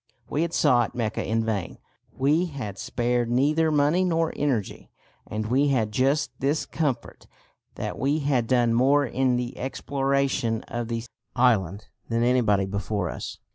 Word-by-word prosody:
We 150 - -1
had 170 0 0
sought 125 -8 +2
Mecca 115 -3 -2
in 115 +1 0
vain. 105 -5 -3 0.3
We 150 +7 +1
had 115 - -6
spared 120 -1 -1
neither 150 +6 +2
money 150 +4 +3
nor 165 -2 +1
energy; 125 -9 -2 0.4
and 110 +1 -3
we 130 +6 +2
had 115 -6 +1
just 135 +4 +1
this 145 +3 0
comfort, 145 -6 -3 0.5
that - - -5
we 140 +3 +1
had 135 -5 +1
done 120 -2 +3
more 140 +4 +4
in 130 0 +1
the 125 +1 -3
exploration 135 -3 -1
of 120 -2 -4
the 115 -1 -3 0.3
island 105 -6 +1 0.2
than 115 0 +1
anybody 115 -6 +3
before 100 -1 -2
us. - - -7
125 Hz, 150 wpm, -25 LUFS, 115-145 Hz, 0.5 s, more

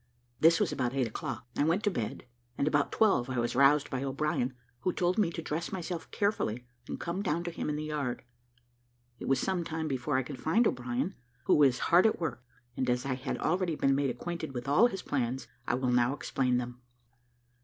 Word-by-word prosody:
This 165 +1 +6
was - - +1
about 125 -1 -1
eight 135 -2 +2
o'clock. 115 +1 -5
I - - +2
went 170 +7 +2
to 205 - +2
bed, 115 - -4 0.3
and 140 - +1
about 145 -2 +2
twelve 195 - +3
I 130 - -2
was 120 +1 0
roused 140 +2 +4
by 130 -2 -2
O'Brien, 135 -2 -1 0.2
who 185 - 0
told 180 +3 +1
me 200 -6 +3
to 165 -1 -6
dress 160 +2 -3
myself 175 -2 -4
carefully, 125 - -1 0.2
and - - -5
come 170 +3 -3
down 170 -3 0
to 175 - -3
him 165 - -3
in 150 - -1
the 150 - -3
yard. 150 -5 -3 1.0
It - - -6
was 135 - +3
some 185 -2 0
time 160 -1 -3
before 130 0 0
I 130 - +1
could 130 0 -8
find 215 +10 +3
O'Brien, 125 - -1 0.3
who - - +3
was 135 -4 +5
hard 175 +9 +5
at 220 - 0
work; 130 -8 -3 0.3
and, 130 - -1
as 125 +1 +1
I 135 - 0
had 130 +1 -3
already 180 0 0
been 135 -2 +2
made 140 0 +1
acquainted 160 +3 -5
with 120 +1 -4
all 150 +12 +6
his 195 -5 -6
plans, 130 -2 -2 0.2
I - - +2
will 125 0 0
now 125 +2 +3
explain 125 -3 0
them. 125 0 -5
145 Hz, 215 wpm, -30 LUFS, 125-170 Hz, 1.0 s, This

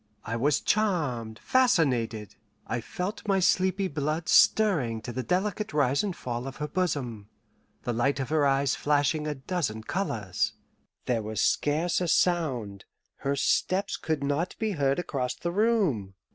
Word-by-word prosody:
I 115 - -3
was 140 +5 +2
charmed, 145 - 0
fascinated. 125 - +1 0.3
I 120 - -2
felt 180 - -5
my 195 -1 +3
sleepy 190 +1 +2
blood 155 +1 -2
stirring 155 - +4
to 120 - -6
the 130 - -2
delicate 195 - -1
rise 140 -2 +2
and 195 -4 -2
fall 120 -2 -4
of 135 - -6
her 150 - -4
bosom, 140 - -2 0.5
the 120 - -1
light 135 +5 +1
of 135 - -3
her 150 -2 +3
eyes 135 -1 +2
flashing 150 +1 +1
a 150 - -2
dozen 130 -6 -3
colours. 110 - -2 0.5
There 120 -3 0
was 110 0 -4
scarce 165 +5 +1
a 175 - 0
sound 130 - 0 0.3
her 140 +1 -1
steps 185 +7 +1
could 155 -3 -2
not 145 +6 -1
be 220 -1 -1
heard 140 -6 +1
across 130 -7 -2
the 170 - -3
room. 180 - +1
145 Hz, 155 wpm, -27 LUFS, 120-180 Hz, 0.5 s, stirring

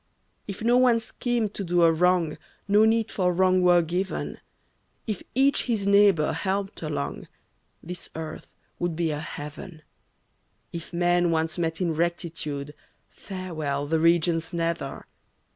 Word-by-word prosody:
If 200 +1 -6
no 240 +2 +4
one 245 -2 +5
schemed 225 -1 -2
to 200 - -4
do 175 -1 +2
a 165 - +6
wrong, 175 -1 +2 0.3
No 205 +2 +5
need 225 0 +2
for 180 -2 +1
wrong 185 +1 +3
were 175 -1 +5
given; 180 +4 -3 0.7
If 215 -5 -3
each 275 +2 +3
his 220 -5 -1
neighbor 200 -6 +5
helped 195 0 -2
along, 145 - -4 0.6
This 180 +1 -6
earth 160 -1 -6 0.3
would 175 -2 -1
be 165 -1 0
a 150 - -3
heaven; 155 +2 -8 0.9
If 170 -1 -7
men 175 0 +2
once 160 +1 0
met 165 +1 -1
in 170 -3 +1
rectitude, 155 -3 -3 0.4
Farewell, 155 -7 -4
the 160 +2 +1
regions 165 0 +2
nether. 165 -5 -2
175 Hz, 140 wpm, -26 LUFS, 160-195 Hz, 0.9 s, a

